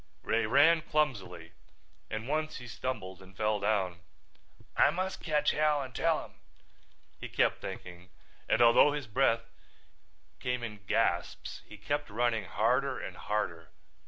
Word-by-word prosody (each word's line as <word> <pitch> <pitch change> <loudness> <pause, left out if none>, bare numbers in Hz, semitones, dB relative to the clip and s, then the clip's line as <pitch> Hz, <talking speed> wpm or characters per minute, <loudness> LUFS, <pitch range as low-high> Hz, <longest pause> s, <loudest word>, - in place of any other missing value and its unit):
Ray 115 -1 +1
ran 150 +7 +5
clumsily 100 - -1 0.6
and 110 +2 -4
once 155 +2 -1
he 125 - -9
stumbled 115 -6 -5
and 95 0 -16
fell 105 -1 +1
down. 100 -4 0 0.8
"I - - +6
must 185 +2 -3
catch 150 -3 +2
Hal 150 -1 +2
and 130 -1 -9
tell - - +1
him," - - -19 0.8
he - - -7
kept - - +1
thinking, 90 0 -8 0.4
and 120 - +4
although 120 +5 +6
his 145 -2 -3
breath 115 0 +2 0.9
came 125 -1 -2
in 105 -3 -6
gasps - - 0
he 105 - -11
kept 145 +7 -2
running 115 -1 0
harder - - +1
and - - -6
harder. 85 -6 -3
115 Hz, 140 wpm, -31 LUFS, 100-145 Hz, 0.9 s, I